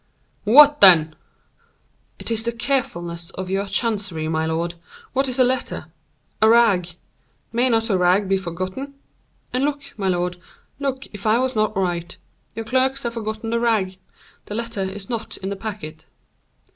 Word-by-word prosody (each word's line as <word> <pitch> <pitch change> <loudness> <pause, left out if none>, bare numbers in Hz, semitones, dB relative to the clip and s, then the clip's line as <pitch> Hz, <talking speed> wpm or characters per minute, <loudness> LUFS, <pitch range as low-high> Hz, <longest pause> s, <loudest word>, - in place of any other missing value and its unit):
"What 290 +6 +7
then?" 165 -5 +7 1.0
"It - - -7
is 225 -1 +1
the 235 +1 -1
carefulness 175 -9 -2
of 185 0 -5
your 195 +1 -1
chancery, 200 -6 -1
my 160 0 0
lord. 165 +1 -1 0.4
What 270 +1 +1
is 255 - -2
a 255 - +6
letter? 255 +1 -2 0.5
A 220 - +6
rag. 225 -7 +4 0.7
May 245 +2 +2
not 225 -1 +2
a 190 - +3
rag 180 +3 +3
be 195 - +2
forgotten? 185 +10 -5 0.6
And 255 +2 +1
look, 280 -1 -3
my 195 - 0
lord, 180 -1 0 0.4
look 275 -1 -2
if 205 +1 -5
I 215 +2 +4
was 255 0 0
not 215 -2 +1
right. 175 -2 -2 0.4
Your 225 0 -5
clerks 260 +3 +1
have 235 -1 -2
forgotten 220 0 -4
the 235 - +1
rag; 205 -6 0 0.5
the 205 - -5
letter 230 -3 -3
is 195 +1 -4
not 230 -2 -4
in 195 - -5
the 200 - -3
packet." 195 -7 -7
215 Hz, 165 wpm, -22 LUFS, 185-235 Hz, 1.0 s, What